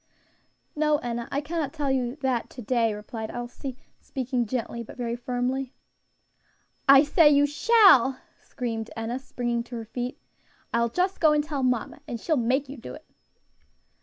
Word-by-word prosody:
"No, 300 0 +2
Enna; 235 -3 -4
I 280 - 0
cannot 295 -2 -3
tell 290 -4 -1
you 250 -1 0
that 260 -3 0
to 250 - -9
day," 230 0 +2
replied 220 +1 -6
Elsie, 245 +2 -6 0.2
speaking 250 -2 -2
gently, 235 0 -3
but 235 - -10
very 235 -1 -2
firmly. 250 +2 -2 1.2
"I 275 +1 +9
say 300 +1 +5
you 285 0 +5
shall!" 295 - +5 0.2
screamed 225 -3 -4
Enna, 230 +3 -3
springing 240 -3 -2
to 240 - -8
her 230 -1 -5
feet. 245 +3 -5 0.5
"I'll 235 0 +2
just 365 +8 0
go 310 -2 +5
and 300 0 +2
tell 290 -2 -3
mamma, 250 0 -1
and 240 -4 -4
she'll 315 - 0
make 260 +2 +1
you 275 +2 -8
do 235 - -8
it." 310 - -14
255 Hz, 165 wpm, -26 LUFS, 235-290 Hz, 1.2 s, I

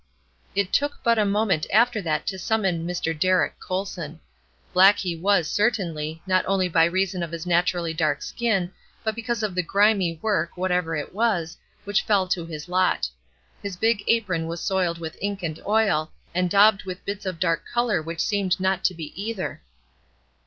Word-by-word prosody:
It 200 -1 0
took 290 0 +1
but 230 -1 +3
a 210 - +3
moment 200 -5 +1
after 230 +1 +3
that 155 -4 -1
to 190 -1 -3
summon 190 -5 0
"Mr. 175 -2 -1
Derrick 185 +4 +1
Colson." 180 -4 -4 0.5
Black 190 +3 +7
he 180 -3 -2
was, 180 -1 +2
certainly, 170 -8 -1
not 185 -1 +2
only 190 -1 +2
by 165 -1 +4
reason 185 +1 0
of 170 -1 -4
his 170 0 -5
naturally 175 -1 +1
dark 155 -1 0
skin, 195 -7 -1 0.3
but 220 - 0
because 230 0 -3
of 210 -3 -1
the 180 - +1
grimy 195 -2 +2
work, 205 -4 -1
whatever 180 -2 0
it 150 +2 -5
was, 195 -7 0 0.3
which 205 -1 +1
fell 200 -3 +2
to 175 -2 -1
his 155 0 -7
lot. 180 - +2 0.5
His 200 -3 -5
big 220 0 +1
apron 185 -8 +1
was 165 +1 -4
soiled 180 -3 0
with 160 -1 -7
ink 200 -1 -3
and 160 -2 -4
oil, 205 -8 +2 0.2
and 180 0 +1
daubed 205 +1 +5
with 185 0 -7
bits 200 -1 -4
of 185 -3 -4
dark 165 -2 +1
color 240 -7 +1
which 165 +1 -4
seemed 200 -3 0
not 190 0 0
to 185 - +2
be 160 -2 -7
either. 200 +1 -4
185 Hz, 180 wpm, -24 LUFS, 170-205 Hz, 0.5 s, Black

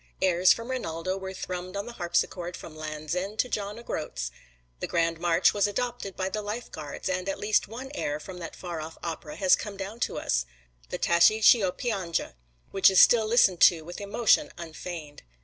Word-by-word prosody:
Airs 180 -1 +4
from 230 +2 0
"Rinaldo" 185 -7 -3
were 190 0 -6
thrummed 185 0 -6
on 200 - -3
the 240 - -8
harpsichord 175 -1 -1
from 155 - -11
Land's 155 0 -5
End 195 +4 -3
to 250 - +2
John 210 -2 -3
O'Groat's. - - -4 0.5
The - - -3
grand 165 -1 0
march 170 -1 +3
was 205 -1 +2
adopted 235 -2 -3
by 190 - -2
the 210 +3 -3
Life 210 +4 -5
Guards, 150 -2 -6
and 185 +1 -1
at 195 - -2
least 210 +1 +1
one 250 +6 -8
air 150 - -2
from 180 +3 -9
that 165 -2 -7
far 175 -3 -6
off 160 +1 -8
opera 160 -2 -5
has 190 -2 +5
come 205 -2 -7
down 200 +4 -6
to - - -1
us - - 0 0.4
the - - -3
"Tascie 170 +6 +4
Ch'io 205 -5 +6
Pianga," 190 - -2 0.4
which 195 - +6
is 190 - +4
still 225 -2 +6
listened 215 -6 +4
to 165 -3 +6
with 175 +4 -8
emotion 205 +3 +2
unfeigned. 160 -2 -8
185 Hz, 195 wpm, -27 LUFS, 165-210 Hz, 0.5 s, Ch'io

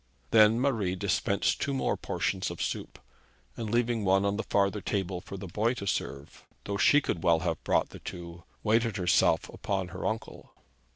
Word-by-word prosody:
Then 110 +1 +6
Marie 110 -9 0
dispensed 100 +1 0
two 140 - -1
more 135 - 0
portions - - -2
of - - -7
soup, - - -3 0.6
and 110 - -4
leaving 120 -1 +1
one 95 +1 +3
on 100 0 +1
the 110 - -1
farther 100 +1 +2
table 95 -2 -2
for 100 +1 -8
the 95 - -7
boy 110 +7 0
to 100 - -6
serve, 70 -6 -4 0.2
though 100 - -3
she 145 +8 +5
could 85 - -2
well 85 -1 +3
have - - -2
brought - - +1
the - - -11
two, 85 -1 -8 0.2
waited 115 0 +2
herself 90 -2 +3
upon 95 -3 -3
her - - -4
uncle. 110 +1 -6
100 Hz, 180 wpm, -29 LUFS, 95-115 Hz, 0.6 s, Then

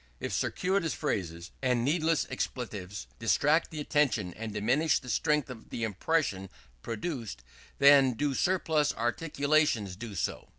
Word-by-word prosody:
If - - -4
circuitous 185 -3 0
phrases 85 - -3
and 125 -2 +1
needless 160 +1 +2
expletives 105 -7 -4
distract 145 +8 +2
the 155 - -7
attention 130 - +1
and 110 0 -6
diminish 130 +9 +2
the 125 - -8
strength 150 +6 +1
of 125 -3 -10
the 115 - -4
impression 105 - -1 0.3
produced, 115 - -5 0.3
then 140 -2 +6
do 140 +4 -1
surplus 160 -2 +1
articulations 145 - +1
do 105 +1 -8
so. 85 - -3
130 Hz, 130 wpm, -29 LUFS, 105-150 Hz, 0.3 s, then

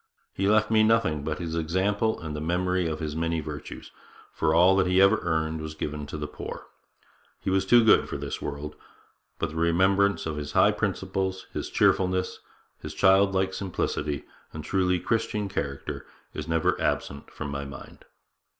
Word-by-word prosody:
He 95 - 0
left 105 +1 +3
me 110 -1 +5
nothing 110 -9 +2
but 75 0 -2
his 80 -1 -5
example 95 +7 0
and 80 -2 -6
the 75 - -4
memory 90 +2 0
of 80 -1 -3
his 75 -2 -4
many 80 0 -1
virtues, 75 -1 -8 0.4
for 75 - +1
all 90 +4 +5
that 95 -1 +3
he 90 +1 +3
ever 100 +3 +5
earned 80 -2 -1
was 80 0 -6
given 75 -1 -4
to 75 - -6
the 75 - -4
poor. 75 - -7 0.7
He 95 - -2
was 95 0 +1
too 120 -1 +6
good 110 - +5
for - - -3
this - - -5
world; 75 +1 -5 0.6
but - - -2
the 80 - -7
remembrance 95 +4 +2
of 80 -2 -3
his 75 -1 -5
high - - +5
principles, 95 -1 -2
his - - -4
cheerfulness, 95 0 +1 0.4
his - - -8
childlike 95 0 +3
simplicity 75 -6 -3 0.3
and 80 - -7
truly 90 +2 +1
Christian 110 +2 -1
character, 70 -8 -4 0.3
is 75 0 -5
never 80 -1 +1
absent 70 0 -2
from 75 -2 -6
my 70 0 -3
mind.' 70 -1 -11
85 Hz, 175 wpm, -26 LUFS, 75-95 Hz, 0.7 s, too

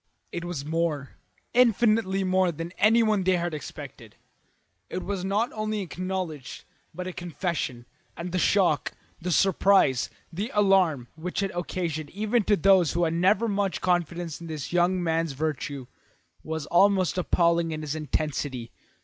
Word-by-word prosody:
It 170 - -4
was 175 -5 -4
more, 155 -3 -1 0.4
infinitely 220 -5 +3
more, 185 -1 +2
than 165 +2 -6
anyone 215 -1 +4
there 185 0 +3
had 175 -1 -2
expected. 150 - -9 0.7
It 185 - -4
was 195 -2 -3
not 205 +5 0
only 215 0 -2
an 205 - -2
acknowledgment 180 -6 -5 0.3
but 180 +3 -6
a 185 - -5
confession, 165 -8 -3 0.3
and 175 +1 -5
the 185 - 0
shock, 175 -9 +2 0.3
the 180 - -3
surprise, 190 -7 +3 0.2
the 200 +7 -3
alarm, 185 -11 +3
which 180 +4 -3
it 195 - -1
occasioned 170 -3 -3
even 215 +3 0
to 210 - +4
those 190 -2 +4
who 175 - +1
had 165 -1 +1
never 190 +7 +3
had 210 - -1
much 200 -1 0
confidence 175 -2 -1
in 170 - -7
this 155 -1 -5
young 180 +1 +2
man's 165 -2 0
virtue, 140 -2 -3 0.6
was 160 -2 -4
almost 185 0 +3
appalling 170 -1 +2
in 155 -1 -4
its 150 -1 -3
intensity. 145 -5 -3
175 Hz, 155 wpm, -26 LUFS, 160-195 Hz, 0.7 s, anyone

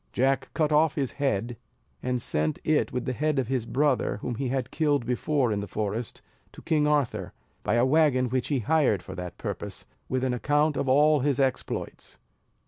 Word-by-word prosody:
Jack 135 +1 +1
cut 155 -2 +1
off 155 0 +3
his 135 -4 -1
head, 120 -4 -1 0.4
and 125 0 -1
sent 75 -8 -1
it 155 -1 +1
with 125 - -3
the 130 - -1
head 150 +4 0
of 135 - +1
his 125 -4 -1
brother, 135 -6 +1
whom 125 - -3
he 130 +3 -2
had 130 0 -2
killed 145 -6 +1
before 125 +1 0
in 105 - 0
the 100 - -5
forest, 110 +3 -4 0.3
to - - -13
King 150 -2 +2
Arthur, 145 -5 0 0.3
by 105 - 0
a 120 +1 +4
wagon 135 -3 +3
which 130 +1 -1
he 145 - +1
hired 130 - +2
for - - -8
that 90 -1 -7
purpose, - - -5 0.2
with 130 0 -1
an 130 -1 +1
account 145 +4 +1
of 135 - -1
all 150 +3 +5
his 140 0 0
exploits. 135 -2 -2
130 Hz, 195 wpm, -27 LUFS, 120-150 Hz, 0.4 s, all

